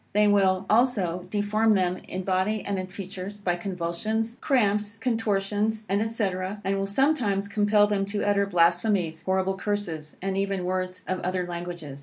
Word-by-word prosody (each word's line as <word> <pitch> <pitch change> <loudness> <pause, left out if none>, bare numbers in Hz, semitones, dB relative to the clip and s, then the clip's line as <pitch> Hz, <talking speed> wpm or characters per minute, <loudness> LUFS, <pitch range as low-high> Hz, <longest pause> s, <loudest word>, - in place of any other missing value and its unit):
They 210 +1 +4
will 190 -2 +3
also 200 -7 +2
deform 210 +2 +2
them 180 -1 +1
in 185 +1 -4
body 190 +3 0
and 200 -1 -1
in 185 - -4
features, 195 +1 -7
by 180 -3 0
convulsions, 195 +5 -2
cramps, 210 -4 +1
contortions, 215 -2 0
&c., 215 +1 0 0.3
and 195 +1 0
will 195 - -1
sometimes 205 -4 +1
compel 205 0 +3
them 205 -1 0
to 205 +1 -2
utter 200 -1 +2
blasphemies, 175 -1 +2
horrible 190 0 0
curses, 180 -7 -3
and 190 0 -2
even 195 -2 -1
words 185 0 -2
of 185 0 -1
other 180 0 -1
languages. 175 -5 -6
195 Hz, 155 wpm, -26 LUFS, 185-210 Hz, 0.3 s, They